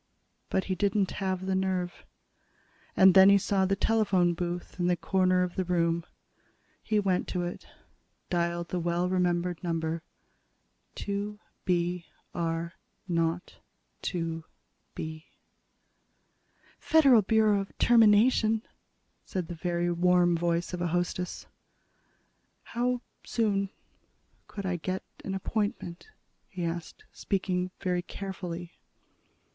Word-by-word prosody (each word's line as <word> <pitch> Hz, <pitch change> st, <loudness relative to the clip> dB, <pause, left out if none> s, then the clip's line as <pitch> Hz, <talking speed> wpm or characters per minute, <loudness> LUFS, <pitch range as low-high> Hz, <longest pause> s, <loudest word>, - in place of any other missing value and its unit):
But 190 Hz, -, +1 dB
he 190 Hz, -, -2 dB
didn't 200 Hz, +1 st, +1 dB
have 190 Hz, -1 st, -1 dB
the 190 Hz, -, 0 dB
nerve. 185 Hz, -2 st, -2 dB, 0.9 s
And 190 Hz, -1 st, +8 dB
then 190 Hz, 0 st, +9 dB
he 200 Hz, -, +7 dB
saw 195 Hz, 0 st, +1 dB
the 195 Hz, -, +2 dB
telephone 195 Hz, -5 st, +2 dB
booth 175 Hz, +1 st, -4 dB
in 175 Hz, -, +1 dB
the 180 Hz, -1 st, +2 dB
corner 185 Hz, -1 st, +2 dB
of 180 Hz, -1 st, -3 dB
the 190 Hz, -, 0 dB
room. 170 Hz, -1 st, 0 dB, 0.7 s
He 215 Hz, -1 st, +1 dB
went 190 Hz, -3 st, +1 dB
to 180 Hz, -1 st, -2 dB
it, 175 Hz, -, -6 dB, 0.6 s
dialed 170 Hz, -1 st, -1 dB
the 180 Hz, -, -1 dB
well 175 Hz, +1 st, 0 dB
remembered 180 Hz, -1 st, 0 dB
number: 165 Hz, -1 st, -1 dB, 0.9 s
"2 205 Hz, +1 st, -3 dB, 0.3 s
B 175 Hz, -1 st, 0 dB, 0.3 s
R 170 Hz, 0 st, -2 dB, 0.3 s
0 165 Hz, -1 st, +1 dB, 0.6 s
2 165 Hz, -3 st, -3 dB, 0.5 s
B." 155 Hz, 0 st, -6 dB, 1.5 s
"Federal 275 Hz, -8 st, +6 dB
Bureau 215 Hz, 0 st, +3 dB
of 195 Hz, -, -10 dB
Termination," 225 Hz, 0 st, +5 dB, 0.6 s
said 185 Hz, -3 st, -4 dB
the -, -, -4 dB
very 175 Hz, +1 st, -1 dB
warm 175 Hz, 0 st, +3 dB
voice 170 Hz, +1 st, 0 dB
of 180 Hz, -, -3 dB
a 175 Hz, -, +1 dB
hostess. 175 Hz, +1 st, -2 dB, 1.2 s
"How 245 Hz, +1 st, -1 dB, 0.2 s
soon 200 Hz, -4 st, 0 dB, 0.8 s
could 200 Hz, -2 st, -6 dB
I 185 Hz, -1 st, 0 dB
get 185 Hz, +3 st, -3 dB, 0.2 s
an 195 Hz, -, -3 dB
appointment?" 205 Hz, -, -3 dB, 0.4 s
he 180 Hz, -3 st, -4 dB
asked, 170 Hz, 0 st, -5 dB
speaking 185 Hz, -2 st, -1 dB
very 180 Hz, -1 st, 0 dB
carefully. 180 Hz, -2 st, -6 dB
180 Hz, 120 wpm, -29 LUFS, 175-195 Hz, 1.5 s, then